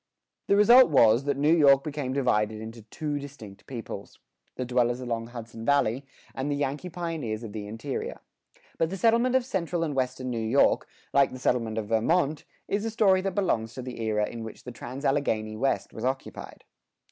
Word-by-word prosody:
The 200 - +4
result 235 +4 +7
was, 120 -3 +5
that 145 - 0
New 150 +3 +4
York 140 -4 +6
became 145 -3 -3
divided 110 -5 +1
into 110 +1 -8
two 145 +7 -4
distinct 130 -8 -11
peoples: 115 -5 -7 0.4
the 130 - -3
dwellers 120 0 +1
along 115 -2 -3
Hudson 115 -1 -9
Valley, 135 0 +1 0.3
and 135 +2 -3
the 145 - 0
Yankee 145 +5 -2
pioneers 160 -11 -4
of 110 -3 -7
the 105 -2 -5
interior. 115 +6 -5 0.6
But 165 - +2
the 195 - -4
settlement 235 +5 +3
of 260 -2 +3
central 175 -7 -1
and 155 -3 -2
western 130 -1 -2
New 115 - -2
York, 120 +6 +3 0.3
like 140 -1 +4
the 130 - -7
settlement 115 -3 0
of 105 -2 -3
Vermont, 145 +7 +1 0.2
is 205 +1 -1
a 225 - -1
story 205 -4 +3
that 190 -1 -3
belongs 115 - 0
to 130 - -6
the 125 -2 -7
era 105 -1 0
in 115 -1 -7
which 110 - -9
the 125 - -7
trans 125 +4 -7
Alleghany 110 -6 0
West 135 +5 -1
was - - -7
occupied. 130 +1 -4
130 Hz, 190 wpm, -27 LUFS, 115-155 Hz, 0.6 s, result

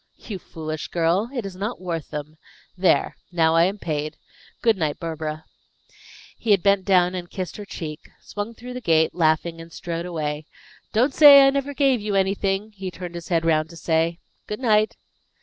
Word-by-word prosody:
"You 205 -5 -7
foolish 155 -2 -6
girl! 175 +6 +1
It 245 -6 -4
is 195 -2 -6
not 210 +6 -4
worth 170 -4 -4
them. 150 +1 -7 0.4
There! 185 0 +2
Now 160 -2 +3
I 165 +1 +6
am 195 +3 -1
paid. 155 -5 -3 0.5
Good 225 -2 +4
night, 155 -5 -2
Barbara." 155 -1 -5 0.9
He 230 - -5
had 200 -4 +4
bent 200 -2 +3
down 180 -2 +4
and 175 -1 -5
kissed 185 -3 -5
her 205 - -7
cheek, 155 -5 -7
swung 210 +3 -6
through 250 +2 -9
the 250 - -6
gate, 160 -6 +3
laughing, 165 0 +1
and 165 0 -12
strode 170 +1 -5
away. 155 -3 -3 0.4
"Don't 250 +6 +2
say 285 -2 +9
I 275 - +5
never 280 +1 -2
gave 270 -4 +3
you 205 -1 -2
anything," 195 +2 0
he 195 -3 -6
turned 175 0 -8
his 170 -1 -7
head 165 -2 +1
round 155 -1 +2
to 170 - -12
say, 165 +1 0 0.3
"Good 210 - -4
night." 215 -4 +2
180 Hz, 185 wpm, -23 LUFS, 160-210 Hz, 0.9 s, say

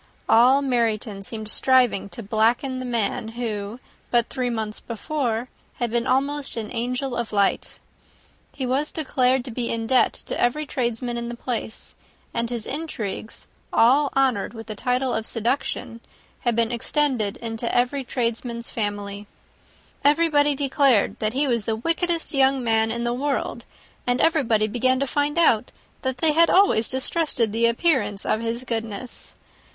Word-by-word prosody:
All 255 +5 +5
Meryton 225 -5 0
seemed 220 +2 -6
striving 250 -3 +3
to 235 - -8
blacken 230 +5 +1
the 255 - -5
man 230 -3 -1
who, 225 -1 -4 0.3
but 240 -1 +2
three 250 -1 -2
months 220 -2 -3
before, 235 0 -3 0.3
had 240 -2 -2
been 235 0 0
almost 280 +1 0
an 220 -2 -4
angel 250 +2 -2
of 235 -2 -3
light. 200 -2 0 0.7
He 265 - -4
was 270 +4 0
declared 260 -4 +1
to 255 - -6
be 235 +1 -3
in 230 -1 -2
debt 255 +2 +3
to - - -3
every 300 +6 +1
tradesman 240 -2 -2
in 235 0 -5
the 240 - -6
place, 235 -3 -4 0.4
and 235 0 -1
his 235 -3 -4
intrigues, 230 -9 -5 0.3
all 275 +5 +4
honoured 250 -5 +1
with 225 0 -8
the 215 - -5
title 250 +4 0
of 220 0 -1
seduction, 235 0 -2 0.4
had 240 -2 0
been 230 0 +2
extended 240 -3 0
into 230 0 -4
every 250 +3 +1
tradesman's 235 -1 -3
family. 205 -1 -4 0.8
Everybody 295 -1 +3
declared 275 -5 +2
that 215 0 -1
he 280 +3 +1
was 235 -5 0
the 220 - 0
wickedest 330 +7 0
young 270 -1 +3
man 225 -1 +2
in 235 +1 -2
the 240 0 0
world; 275 +3 -2 0.4
and 245 +1 +1
everybody 235 -10 +3
began 255 +4 +1
to 275 - +1
find 290 +3 -1
out 245 -9 +3 0.3
that 260 -1 -2
they 310 +4 +2
had 335 +2 +5
always 365 - +4
distrusted 260 -4 +1
the 230 +1 +3
appearance 235 - +1
of 220 - 0
his 230 +2 -3
goodness. 230 0 -5
240 Hz, 155 wpm, -23 LUFS, 225-270 Hz, 0.8 s, All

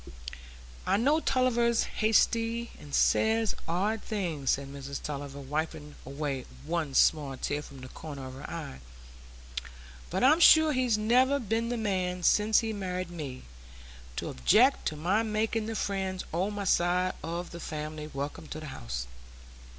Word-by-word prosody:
"I - - +3
know 285 +8 +3
Tulliver's 240 -5 +2
hasty, 230 +2 +1
and 145 - -12
says 225 0 +3
odd 205 +6 0
things," 170 -10 -3
said 140 0 0
Mrs 140 0 -6
Tulliver, 140 -1 -6
wiping 150 +1 -4
away 140 -2 -3 0.2
one 160 -4 -2
small 145 -4 +3
tear 145 +2 -2
from 140 -3 -12
the 130 - -8
corner 140 -1 -8
of 130 - -8
her 135 - -8
eye; 65 - -6 1.3
"but - - -1
I'm 300 +5 +6
sure 315 -2 +7
he's 250 -4 +2
never 250 +6 +3
been 230 -2 -1
the 245 - -1
man, 185 -4 -1
since 215 +4 +4
he 225 -1 -2
married 185 -3 -4
me, 140 -7 -6 0.7
to - - -3
object 235 - +4
to 155 - -2
my 180 +8 +1
making 220 0 -1
the 225 - -3
friends 190 -3 -2
o' 180 +4 +1
my 205 -1 -4
side 180 0 +2
o' 170 +2 -3
the 170 -1 -10
family 155 -1 -5
welcome 140 +3 -5
to 155 - -6
the 155 - -8
house." - - -5
180 Hz, 155 wpm, -29 LUFS, 150-225 Hz, 1.3 s, sure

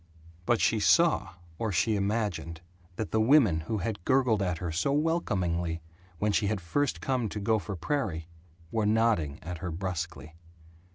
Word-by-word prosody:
But 120 -2 +3
she 110 - +2
saw 155 - +3 0.2
or 110 -2 -1
she 105 +5 +2
imagined 100 -5 -2 0.3
that 110 +2 -4
the 110 - +2
women 115 - +5
who 80 +8 -3
had 100 -1 -3
gurgled 125 -4 +3
at 90 -3 0
her 85 -1 -4
so 90 - 0
welcomingly 90 - 0 0.3
when 105 +4 +1
she 100 0 +1
had 105 -1 0
first 140 +12 -1
come 125 -5 0
to 105 - -5
Gopher 100 -2 0
Prairie 85 - -2 0.4
were 110 -2 +1
nodding 105 -10 +2
at 85 0 -6
her 90 - -4
brusquely. 85 -2 -4
100 Hz, 160 wpm, -29 LUFS, 85-115 Hz, 0.4 s, women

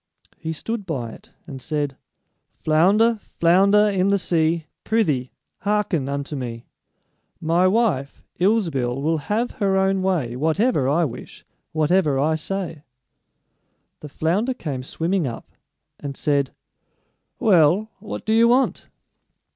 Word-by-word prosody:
He 160 -1 -4
stood 210 +5 -4
by 125 -8 -3
it - - -14
and 135 -2 -8
said: 145 -2 -2 0.6
"Flounder, 205 +9 +3
flounder 200 +5 +3
in 195 -2 +1
the 200 0 +3
sea, 165 -3 0 0.2
Prythee, 150 - 0 0.3
hearken 200 -9 0
unto 140 +1 -3
me: 120 -3 -6 0.7
My 170 +3 +2
wife, 185 - 0 0.2
Ilsebil, 165 - +1
will 160 +3 0
have 220 +9 -1
her 195 -1 +2
own 190 0 +2
way 165 -11 0
Whatever 160 - +1
I 165 +4 +2
wish, 130 - -8 0.3
whatever 155 -1 +2
I 150 +4 +2
say." 165 0 -4 1.2
The 150 - -9
flounder 195 - 0
came 140 - -4
swimming 165 +5 -1
up, 115 - -8 0.5
and 140 -2 -6
said: 140 -3 +1 0.9
"Well, 195 0 +4
what 210 +1 -7
do 220 - +1
you 230 +1 +5
want?" 255 +3 +2
165 Hz, 125 wpm, -22 LUFS, 145-200 Hz, 1.2 s, you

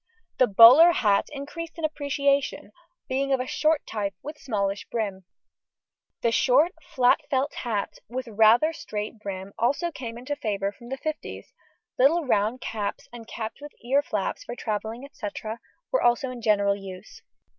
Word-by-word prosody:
The 255 - +6
bowler 250 - +9
hat 205 -8 +2
increased 305 +4 -7
in 325 - -1
appreciation, 280 -6 0 0.4
being 275 +1 -1
of 265 - +3
a 255 - -2
short 310 +3 +1
type, 200 -3 -3
with 300 +1 -6
smallish 200 -5 -2
brim. 200 -5 -3 1.0
A 235 - +3
short 265 +8 +4
flat 250 -4 +2
felt 270 +1 0
hat, 215 -5 -3
with 255 +1 -4
rather 225 +8 +4
straight 215 -5 -6
brim, 195 -1 -6
also 285 +9 +1
came 235 -6 -7
into 260 +4 -4
favour 200 -7 -2
from 235 +3 -14
the 270 - -4
fifties; 310 +2 -6 0.5
little 305 +6 +4
round 220 +1 +1
caps 210 -2 -4
and 230 -2 -10
caps 225 +3 -6
with 295 0 -10
ear 275 +4 +3
flaps, 210 -8 -3
for 240 - -7
travelling, 225 +3 -4
&c., 210 - -5 0.6
were - - +2
also 240 +2 +2
in 245 -1 -8
general 200 -3 +3
use. 195 0 -10
240 Hz, 155 wpm, -26 LUFS, 210-280 Hz, 1.0 s, bowler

